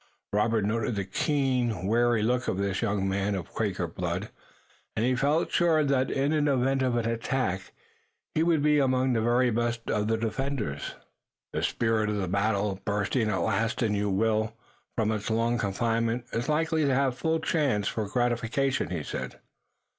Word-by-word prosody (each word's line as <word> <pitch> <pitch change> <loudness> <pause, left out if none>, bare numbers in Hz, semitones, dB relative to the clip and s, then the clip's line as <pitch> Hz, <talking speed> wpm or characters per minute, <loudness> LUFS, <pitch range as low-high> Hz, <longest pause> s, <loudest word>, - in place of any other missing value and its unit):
Robert 105 0 +2
noted 115 +1 0
the 100 -2 -2
keen, 125 - 0
wary 115 +1 +2
look 125 +2 +1
of - - 0
this 100 -1 -1
young 100 -1 0
man 100 +1 0
of 90 -4 -6
Quaker 100 -5 -1
blood, 90 +4 -4 0.6
and 110 - +1
he 130 - +2
felt 145 +6 +1
sure 165 -3 +3
that 135 -2 +1
in 140 +2 0
the 145 -1 +3
event 135 +1 +1
of 130 -2 +1
an 115 -1 0
attack 115 -4 -1 0.6
he 155 - +1
would 165 -3 +2
be 150 0 +4
among 130 -1 +2
the 115 - +1
very 120 +2 +3
best 115 0 -1
of 105 0 0
the 110 0 +1
defenders. 115 - -3 0.6
"The - - -1
spirit 110 -2 +1
of 100 -4 -2
battle, 100 -1 0
bursting 105 +3 0
at 105 - 0
last 115 +6 0
in 110 -2 +1
you, 105 0 0
Will, 110 +2 +1 0.4
from 110 -2 +2
its 105 -1 -2
long 115 +1 +1
confinement, 115 +3 0
is 120 +4 -2
likely 160 +1 +1
to 135 -2 +2
have 135 -2 +1
full 160 +4 0
chance 145 -10 +1
for 110 -2 -2
gratification," 120 - 0
he 85 -4 -3
said. - - -5
115 Hz, 175 wpm, -28 LUFS, 105-130 Hz, 0.6 s, be